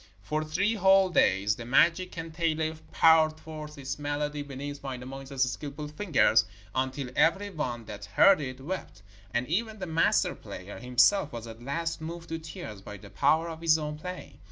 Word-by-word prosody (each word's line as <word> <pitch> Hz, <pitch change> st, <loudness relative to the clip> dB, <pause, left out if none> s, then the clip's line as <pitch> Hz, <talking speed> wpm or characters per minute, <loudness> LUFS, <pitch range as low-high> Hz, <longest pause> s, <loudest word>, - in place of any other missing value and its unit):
For 155 Hz, +8 st, -1 dB
three 185 Hz, +8 st, 0 dB
whole 195 Hz, -2 st, +5 dB
days 100 Hz, -, +3 dB
the 115 Hz, -, -6 dB
magic 170 Hz, +9 st, +3 dB
kantele 160 Hz, -1 st, -2 dB, 0.2 s
poured 160 Hz, -1 st, +5 dB
forth 155 Hz, -1 st, -9 dB
its 135 Hz, 0 st, -5 dB
melody 145 Hz, 0 st, -2 dB
beneath 145 Hz, 0 st, -6 dB
Wainamoinen's 135 Hz, 0 st, -3 dB
skilful 150 Hz, +1 st, -6 dB
fingers, 150 Hz, -, +3 dB, 0.3 s
until 130 Hz, 0 st, -2 dB
every 195 Hz, +5 st, +2 dB
one 125 Hz, -, -4 dB
that 105 Hz, -1 st, -8 dB
heard 155 Hz, -, +5 dB
it 130 Hz, -2 st, -5 dB
wept, 145 Hz, -, -6 dB, 0.3 s
and 120 Hz, +4 st, 0 dB
even 220 Hz, +6 st, -1 dB
the 190 Hz, -, -4 dB
master 165 Hz, -1 st, +2 dB
player 95 Hz, +3 st, -9 dB
himself 135 Hz, +8 st, +3 dB
was 115 Hz, -1 st, -6 dB
at 115 Hz, 0 st, -10 dB
last 165 Hz, +6 st, -3 dB
moved 170 Hz, +1 st, -7 dB
to 165 Hz, 0 st, -3 dB
tears 160 Hz, -, -8 dB
by 105 Hz, +1 st, -9 dB
the 100 Hz, 0 st, -14 dB
power 150 Hz, +9 st, +2 dB
of 165 Hz, -1 st, -7 dB
his 160 Hz, -1 st, +4 dB
own 150 Hz, -1 st, -4 dB
playing. 180 Hz, +3 st, -8 dB
150 Hz, 170 wpm, -28 LUFS, 130-165 Hz, 0.3 s, whole